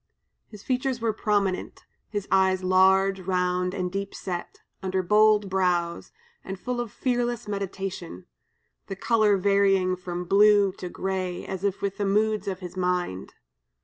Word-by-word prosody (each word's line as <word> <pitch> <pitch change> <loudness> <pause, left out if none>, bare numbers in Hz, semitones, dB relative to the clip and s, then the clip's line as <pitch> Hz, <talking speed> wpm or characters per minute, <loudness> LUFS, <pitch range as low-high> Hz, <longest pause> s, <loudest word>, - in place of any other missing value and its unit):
His 210 -2 -13
features 255 -1 -1
were 225 -1 0
prominent, 205 -3 -1 0.3
his 205 -2 -4
eyes 190 -1 +3
large, 190 +1 +4
round, 180 0 -1
and 180 -2 -2
deep 195 +1 -4
set, 175 -2 -6 0.2
under 190 0 -1
bold 210 +1 +4
brows, 180 -3 0 0.3
and 190 0 -6
full 250 +1 -3
of 235 -3 -6
fearless 240 -3 -1
meditation; 195 - -5 0.6
the 195 - -5
color 215 -1 +3
varying 195 -1 +3
from 180 -1 -5
blue 205 +1 +5
to 180 - -5
gray, 185 -1 -3
as 190 0 -5
if 200 -1 -1
with 200 -1 -2
the 205 - 0
moods 210 +2 +1
of 190 -1 -3
his 180 0 -8
mind. 180 - -2
195 Hz, 145 wpm, -26 LUFS, 185-210 Hz, 0.6 s, blue